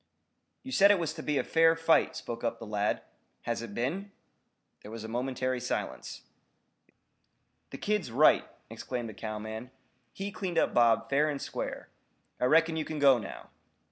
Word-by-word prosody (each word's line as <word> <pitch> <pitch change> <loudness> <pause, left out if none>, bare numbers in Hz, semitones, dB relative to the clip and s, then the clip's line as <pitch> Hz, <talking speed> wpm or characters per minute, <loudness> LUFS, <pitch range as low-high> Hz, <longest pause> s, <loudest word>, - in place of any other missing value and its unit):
"You 260 - -8
said 200 -5 +6
it 205 - +6
was 165 -3 -2
to 160 - -7
be 150 -2 -1
a - - +1
fair 165 0 +4
fight," 165 0 +3
spoke 120 -6 -6
up 115 0 -1
the 115 - -9
lad. 105 -1 -1 0.4
"Has 115 -1 -2
it 110 -3 -8
been?" 180 +12 -2 0.7
There - - -11
was 110 0 -7
a - - -5
momentary 130 +2 -2
silence. 125 - -4 1.5
"The - - -7
kid's 210 -8 -1
right," 145 +6 +5 0.3
exclaimed 120 -3 -5
a - - -12
cowman. 110 +2 -6 0.4
"He 195 +7 -5
cleaned 185 -3 -4
up - - +2
Bob 115 -2 +4
fair 145 +2 +2
and 145 -2 -3
square. - - -5 0.5
I - - +2
reckon 160 +4 +4
you 155 - 0
kin 155 0 -5
go, 135 -4 +5
now." 100 - -9
130 Hz, 170 wpm, -30 LUFS, 115-165 Hz, 1.5 s, said